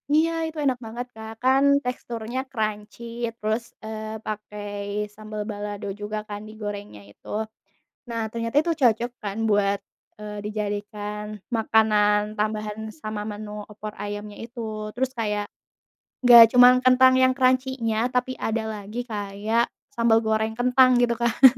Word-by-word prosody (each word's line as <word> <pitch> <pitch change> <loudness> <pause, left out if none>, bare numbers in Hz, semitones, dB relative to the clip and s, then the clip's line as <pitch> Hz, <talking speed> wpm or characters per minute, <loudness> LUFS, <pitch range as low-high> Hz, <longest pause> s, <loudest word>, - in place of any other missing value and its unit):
Iya, 325 +1 +4 0.2
itu 320 0 -8
enak 260 -3 +1
banget, 240 +3 -5
Kak, 220 0 -8
kan 265 +1 +4 0.2
teksturnya 240 -1 -4
crunchy 215 -1 -3 0.3
terus, 220 +1 -1 0.2
eee, 220 0 -6
pakai 205 -1 -4
sambel 215 0 -6
balado 205 -1 -5
juga 210 +1 -3
kan 205 0 -5
digorengnya 205 - -7
itu. - - -21 0.8
Nah, 230 -1 -2
ternyata 230 +2 -4
itu 340 - -3
cocok 235 0 +3
kan 200 +1 -4
buat, 200 -1 +2 0.4
eee, 210 0 -6
dijadikan 210 0 -4
makanan 215 -2 +2
tambahan 215 0 -2 0.2
sama 215 -1 -4
menu 210 0 -6
opor 210 0 -7
ayamnya 205 0 -6
itu, 220 -3 -6
terus 260 +2 -1
kayak 210 -2 -1 0.8
nggak 235 -1 +9
cuman 250 0 +9
kentang 255 0 +6
yang 260 0 +5
crunchy-nya 255 -3 +1
tapi 250 +1 0
ada 220 0 -1
lagi 215 +2 -5
kayak 215 +1 -1 0.2
sambal 230 -3 +4
goreng 220 0 0
kentang, 250 +1 +5
gitu 240 -1 +3
kan. 235 +2 0
220 Hz, 135 wpm, -24 LUFS, 210-240 Hz, 0.8 s, nggak